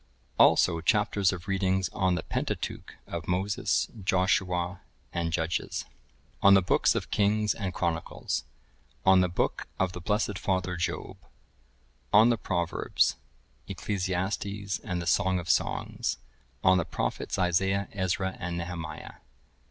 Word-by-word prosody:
Also, 85 -2 +5
Chapters 100 +1 +2
of 95 -1 -7
Readings 95 -1 +1
on 95 -1 +1
the 80 - -3
Pentateuch - - -4
of - - -6
Moses, 100 +6 0 0.2
Joshua, 90 -1 +1 0.3
and 85 -1 -1
Judges; 80 0 -2 0.6
On 100 0 +8
the 95 - +6
Books 90 - +3
of - - -3
Kings 105 +1 +2
and 95 -4 -3
Chronicles; 85 -2 -2 0.6
On 95 -1 +7
the 90 - +2
Book 85 - -1
of 95 -1 +1
the 90 - -7
blessed 105 0 0
Father 95 -2 -1
Job; 85 - -3 0.9
On 110 +3 +7
the 120 - +2
Proverbs,(1048) 85 -3 -2
Ecclesiastes, 100 0 -2
and 90 -1 -3
the 85 - -4
Song 95 +2 +2
of 85 -1 -5
Songs; - - -1 0.5
On 95 0 +5
the 85 - -1
Prophets - - -3
Isaiah, 95 +2 +1
Ezra, 95 -1 -1
and 90 -1 -3
Nehemiah. 85 -3 -6
95 Hz, 130 wpm, -28 LUFS, 90-100 Hz, 0.9 s, On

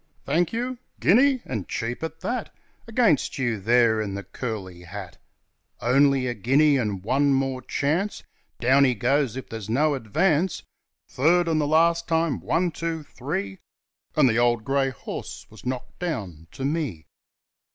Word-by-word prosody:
'Thank 165 +4 +1
you? 245 +2 -3 0.2
Guinea! 255 +6 +4
and 110 -7 -4
cheap 120 0 -3
at 160 0 -6
that! 245 -1 -3 0.4
Against 225 - +2
you 120 -5 -1
there 115 +1 +3
in 100 -2 -3
the 100 - -5
curly 100 -9 -6
hat! 90 +1 -9 0.6
Only 135 +3 +3
a 125 - -1
guinea, 135 +7 +3
and 105 -7 -2
one 140 +6 +2
more 135 -1 -1
chance, 160 +11 -1 0.4
Down 130 +3 +4
he 130 -2 +3
goes 130 +3 +1
if 130 - -6
there's 110 -2 -7
no 145 +6 +2
advance, 155 - +1 0.4
Third, 170 +6 +2
and 160 -2 +2
the 145 - 0
last 165 +2 +3
time, 165 -3 +1
one! 175 0 0
two! 165 -1 -4
three!' 100 -9 -5 0.6
And 150 -3 +5
the 115 -1 +2
old 120 -2 +2
grey 135 +2 +1
horse 130 - -7
was - - -11
knocked 130 -1 -5
down 100 - -4
to 135 - -4
me. 140 - -2
135 Hz, 155 wpm, -25 LUFS, 115-160 Hz, 0.6 s, And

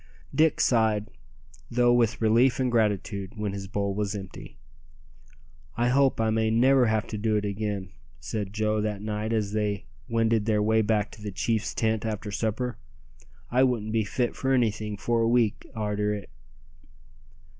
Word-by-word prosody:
Dick 155 +2 +3
sighed, 110 -4 +2 0.6
though 120 0 +3
with 120 -1 +2
relief 120 +4 +4
and 130 -1 +1
gratitude, 105 -3 0
when 105 -2 -2
his 100 -1 -6
bowl 100 0 -2
was 105 0 -2
empty. 95 -7 -9 1.2
"I 120 +1 +2
hope 135 0 +3
I 110 -1 +2
may 110 0 +1
never 125 +3 +4
have 110 0 +1
to 105 - -4
do 110 0 +1
it 105 0 0
again," 100 -2 -3 0.3
said 100 +6 -4
Joe 110 0 0
that 105 -1 -3
night 105 +1 -3
as 105 -3 0
they 105 -4 -1 0.2
wended 115 -1 +1
their 105 -2 +2
way 110 +1 +3
back 105 -1 0
to 110 - -13
the 105 -1 -5
chief's 110 +3 -1
tent 110 -1 0
after 105 -2 -4
supper. 115 +3 -2 0.7
"I 125 +2 +3
wouldn't 120 -5 +1
be 110 -1 +2
fit 120 +4 -1
for 135 0 0
anything 110 -4 0
for 115 +2 0
a 115 - +2
week 115 -3 +1
arter 105 -1 -1
it." 100 -8 -9
110 Hz, 165 wpm, -27 LUFS, 105-115 Hz, 1.2 s, relief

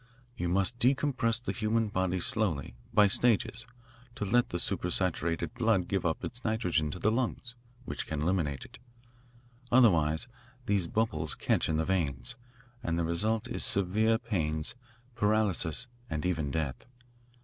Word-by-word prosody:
You 90 -7 -2
must 95 +6 +1
decompress 130 -3 +2
the - - -2
human 110 -1 0
body 95 -2 0
slowly, 85 - -1 0.2
by 105 - +6
stages, 115 +2 +1 0.5
to 105 - -3
let 120 +4 +2
the 85 - -2
super 90 +1 -1
saturated 85 -1 0
blood 110 -7 +1
give 95 -3 0
up 80 - -2
its 120 +1 -5
nitrogen 90 - 0
to 85 - -5
the 105 +4 +1
lungs, 120 0 -2 0.3
which - - -5
can 75 -1 -2
eliminate 80 -6 -1
it. - - -15 0.9
Otherwise 85 -8 +4 0.4
these 100 -6 +1
bubbles 110 +5 -1
catch - - 0
in 80 - +1
the 80 - 0
veins, 95 - -1 0.5
and 85 -7 -1
the 85 - 0
result 110 +8 0
is - - -1
severe 105 +4 +4
pains, 80 -10 -1 0.4
paralysis, 105 -3 +1 0.2
and 75 +1 -3
even 80 -5 0
death. 70 - -3
95 Hz, 150 wpm, -30 LUFS, 85-115 Hz, 0.9 s, by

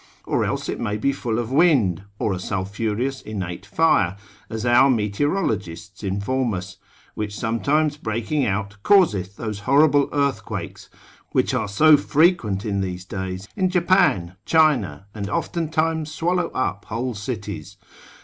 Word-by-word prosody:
Or - - 0
else - - -2
it - - -3
may 105 -2 -2
be 140 +6 +1
full 120 -5 -2
of 120 0 -3
wind, 130 - +3
or 105 - 0
a 90 - -4
sulphureous 105 +7 -2
innate 95 -2 -6
fire, 105 - +2 0.3
as 110 +1 -4
our 120 +3 +5
meteorologists 105 - -1
inform 105 +4 -1
us, 95 +1 -7 0.4
which 105 -1 -4
sometimes 145 +7 +1
breaking 120 +4 -1
out, 100 -1 -2
causeth 105 - +3
those 110 -3 -4
horrible 145 0 +5
earthquakes, 110 -10 -3 0.4
which - - +2
are - - 0
so 150 +10 +6
frequent 145 - +2
in 100 -2 -1
these 90 -1 -4
days 95 0 -5
in 185 -2 +1
Japan, 170 - +2
China, 150 - +2
and 100 -2 -5
oftentimes 160 +3 -1
swallow 175 +3 0
up 105 -6 -3
whole 120 +3 -3
cities. 105 -2 -6
110 Hz, 140 wpm, -22 LUFS, 100-150 Hz, 0.4 s, so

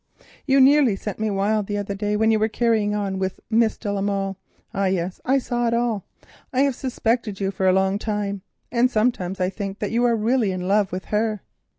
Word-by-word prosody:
You 275 0 +4
nearly 270 -4 +5
sent 205 +1 -6
me 220 0 0
wild 205 +1 0
the 205 - -2
other 200 0 -3
day 205 +1 -1
when 220 +1 +3
you 220 - +3
were 215 - +2
carrying 220 -2 +1
on 195 -2 -2
with 190 0 -2
Miss 225 0 +3
de 205 -3 -3
la 200 - -1
Molle—ah, 195 0 -3
yes, 185 -1 -1
I 265 +2 +3
saw 240 -2 -1
it 230 - +1
all—I 235 +2 -3
have 280 -1 +3
suspected 235 -5 -1
you 195 -1 -1
for 190 -1 0
a - - +6
long 190 +1 +2
time, 205 -2 -2 0.3
and 245 +1 +3
sometimes 215 -6 0
I 185 0 0
think 195 0 -5
that 210 - -3
you 235 +1 +1
are 235 -1 +3
really 225 -1 +1
in 180 -1 -4
love 200 0 +2
with 185 +1 -5
her. 215 -1 -1
210 Hz, 215 wpm, -23 LUFS, 195-230 Hz, 0.3 s, a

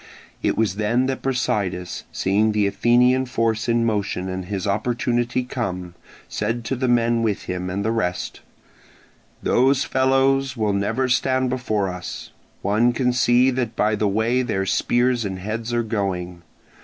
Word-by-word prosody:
It - - 0
was 105 -4 0
then 115 +4 +1
that 135 0 -2
Brasidas, 105 -9 -2
seeing 105 +3 +1
the 105 -1 +2
Athenian 125 +5 +3
force 115 -2 0
in 115 0 +2
motion 100 -4 -1
and 95 0 -4
his 100 +1 -4
opportunity 120 +4 0
come, 90 -9 -4 0.3
said 115 +3 -3
to 135 - -1
the 130 +1 -1
men 120 -1 +2
with 110 -3 -1
him 90 0 -4
and 100 +3 -3
the 110 - +1
rest: 90 -6 -2 1.0
"Those 130 +2 +3
fellows 135 0 +2
will 105 -2 +1
never 110 +6 0
stand 130 +1 +1
before 110 -6 -1
us, 90 -1 -7 0.3
one 110 +5 +2
can 125 0 +1
see 125 +1 +4
that 125 -3 -2
by 105 +1 +2
the 105 0 +1
way 110 +5 +1
their 95 -6 -1
spears 120 +4 +1
and 95 -2 -4
heads 110 +5 -4
are 120 0 +1
going. 95 -5 -3
115 Hz, 155 wpm, -22 LUFS, 100-125 Hz, 1.0 s, see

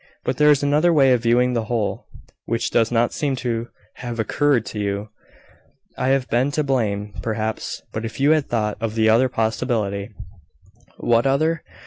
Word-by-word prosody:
"But 125 - -2
there 150 0 +5
is 145 -1 +4
another 150 +4 +3
way 135 -5 +5
of 120 - +1
viewing 125 +1 +2
the 115 -2 -1
whole, 110 -3 -2 0.4
which 115 0 -2
does 115 0 +2
not 120 0 +1
seem 140 -3 -1
to 120 -2 -3 0.3
have 120 -2 -6
occurred 130 +1 +1
to 105 - -6
you. 100 +1 -3 0.9
I - - -2
have 135 -1 +1
been 125 +4 +1
to 150 - +1
blame, 105 -7 -1
perhaps; 110 +1 -3
but 110 - -4
if 115 - -6
you 140 +3 +4
had 155 -3 +1
thought 105 -3 -1
of 115 -1 -3
the 110 -1 +3
other 120 +4 +4
possibility 110 -3 -1 0.5
" - - -30
"What 120 +2 +2
other? 155 +4 +1
120 Hz, 180 wpm, -21 LUFS, 110-135 Hz, 0.9 s, there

